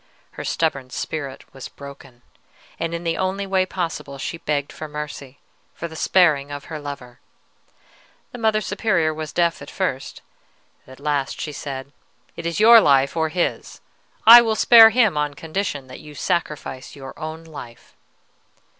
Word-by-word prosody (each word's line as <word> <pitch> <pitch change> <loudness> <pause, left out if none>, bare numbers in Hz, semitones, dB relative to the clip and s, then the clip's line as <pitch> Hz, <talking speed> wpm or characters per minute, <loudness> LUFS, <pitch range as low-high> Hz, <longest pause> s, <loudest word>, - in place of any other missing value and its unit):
Her - - -8
stubborn 140 -5 -1
spirit 140 0 -5
was 135 -1 -8
broken, 135 -3 -13 0.6
and 165 0 -2
in 170 - -6
the 165 -1 -1
only 190 +1 -1
way 190 -1 +1
possible; 165 -6 -4
she 165 +5 -5
begged 145 -2 -2
for 155 - -7
mercy, 150 -2 -7 0.4
for 170 - -5
the 160 - -12
sparing 155 -5 +3
of 145 -1 -7
her 155 - -4
lover. 140 -4 -9 1.1
The 245 - -9
Mother 220 -1 +2
Superior 190 -6 0
was 155 -1 -6
deaf 170 0 0
at - - -9
first; 160 -9 -4 0.6
at 130 +1 -14
last 145 -2 -2
she 150 - -4
said, 140 -1 -7 0.4
'It 170 0 -5
is 170 - -3
your 230 +1 +8
life 140 -3 +3
or 160 -1 0
his. 175 +2 -3 0.5
I 235 +2 +11
will 225 -2 0
spare 225 0 +8
him 220 -7 +2
on 145 -1 -2
condition 160 -3 -4
that 130 0 -11
you 150 -1 -13
sacrifice 150 -5 -3
your 135 -1 -9
own 160 +1 -6
life.' 135 -8 -12
155 Hz, 160 wpm, -22 LUFS, 140-180 Hz, 1.1 s, I